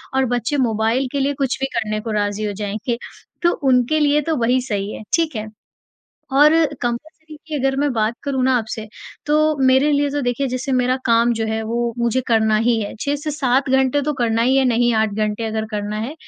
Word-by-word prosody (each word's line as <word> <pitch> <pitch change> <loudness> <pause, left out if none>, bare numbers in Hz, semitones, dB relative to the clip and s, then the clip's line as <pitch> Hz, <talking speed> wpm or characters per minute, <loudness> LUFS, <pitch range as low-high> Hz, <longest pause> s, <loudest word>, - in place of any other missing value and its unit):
और 265 0 +3
बच्चे 245 +5 -1
मोबाइल 225 +4 0
के 280 - -2
लिए 280 +1 +1
कुछ 270 -2 -1
भी 270 - 0
करने 215 -2 -1
को 225 0 -5
राज़ी 205 0 -1
हो 205 - -2
जाएँगे। 215 +3 -3 0.4
तो 345 - +3 0.2
उनके 250 +5 +3
लिए 295 0 +3
तो 320 +2 -1
वही 245 +2 +2
सही 205 -5 -3
है, - - -8
ठीक 325 -5 -1
है? 215 0 -3 0.9
और 295 +3 +6 0.3
कंपल्सरी 305 +6 -5
की 310 - -6
अगर 270 0 0
मैं 285 -1 +1
बात 220 0 0
करूँ 270 -2 -1
ना 260 -1 +3
आपसे, 220 0 -5 0.4
तो 305 0 +2
मेरे 265 +3 +4
लिए 285 0 +1
तो 290 0 -2
देखिए 245 +3 -1
जैसे 255 +2 -3
मेरा 255 0 +2
काम 235 +1 +3
जो 225 0 -2
है 220 0 -2
वो 235 +1 -1
मुझे 235 +2 +1
करना 220 -2 +3
ही 230 -2 +2
है। 205 - -5
6-7 280 -2 0
घंटे 265 +2 +2
तो 300 +2 -1
करना 230 -1 +1
ही 260 +3 +3
है, 270 - +3
नहीं 240 -1 +2
8 220 -1 +2
घंटे 215 +1 -1
अगर 220 0 -2
करना 210 0 -3
है। 240 +8 -4
245 Hz, 210 wpm, -20 LUFS, 220-280 Hz, 0.9 s, और